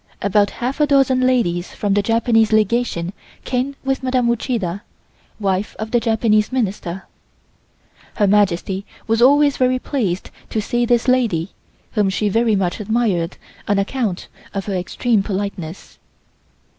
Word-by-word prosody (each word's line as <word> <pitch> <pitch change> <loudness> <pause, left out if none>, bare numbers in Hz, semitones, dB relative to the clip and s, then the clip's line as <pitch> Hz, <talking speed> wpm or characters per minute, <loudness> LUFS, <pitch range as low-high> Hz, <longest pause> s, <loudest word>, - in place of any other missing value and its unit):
About 200 +1 +3
half 255 +5 -4
a 300 - +4
dozen 270 -2 +3
ladies 180 -9 0
from 205 -1 0
the 205 - +3
Japanese 225 0 +2
Legation 215 -4 +1 0.3
came 260 +2 -1
with 270 0 -1
Madame 255 -2 +1
Uchida, 215 -6 -2 0.6
wife 195 0 -1
of 220 0 -5
the 240 - +3
Japanese 220 -1 +2
Minister. 195 -7 -2 1.1
Her 210 - +2
Majesty 195 -1 +1 0.2
was 225 +1 +1
always 285 +2 +5
very 255 0 +2
pleased 215 -9 -2 0.2
to 220 - -1
see 240 +3 0
this 240 0 +2
lady 225 -9 +1 0.4
whom 210 -3 +1
she 205 +2 0
very 225 +1 +2
much 185 -1 -1
admired 210 -6 0 0.3
on 205 - +2
account 200 -2 -2 0.3
of 195 - -2
her 200 - -3
extreme 200 +4 0
politeness. 195 -4 -5
215 Hz, 140 wpm, -19 LUFS, 195-245 Hz, 1.1 s, always